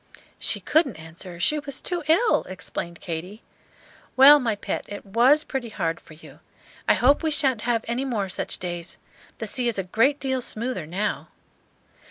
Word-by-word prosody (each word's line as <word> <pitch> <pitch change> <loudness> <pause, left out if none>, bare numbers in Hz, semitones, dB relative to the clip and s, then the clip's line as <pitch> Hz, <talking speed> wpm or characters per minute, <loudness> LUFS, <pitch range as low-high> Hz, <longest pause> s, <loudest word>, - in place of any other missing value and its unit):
"She - - -1
couldn't 300 - +2
answer; 170 +2 -10
she 300 +12 +2
was 280 -2 -5
too 355 -2 -3
ill," 370 +9 +4
explained 170 -2 -6
Katy. 180 +6 -6 0.7
"Well, 285 +3 +9
my 230 -5 0
pet, - - -4
it 205 0 -8
was 245 +9 +4
pretty 260 -4 -4
hard 170 -6 -2
for 155 - -15
you. 155 - -15 0.5
I - - +6
hope 275 +4 +4
we 320 - 0
sha'n't 275 -7 +1
have 230 -2 +1
any 240 +3 -1
more 225 -7 -2
such 190 - -4
days. 175 -1 -6 0.4
The - - -4
sea 250 -2 0
is 235 - 0
a 195 - -1
great 230 +10 +2
deal 265 -1 -1
smoother 235 -7 -2
now." 195 +6 -2
230 Hz, 175 wpm, -24 LUFS, 185-270 Hz, 0.7 s, Well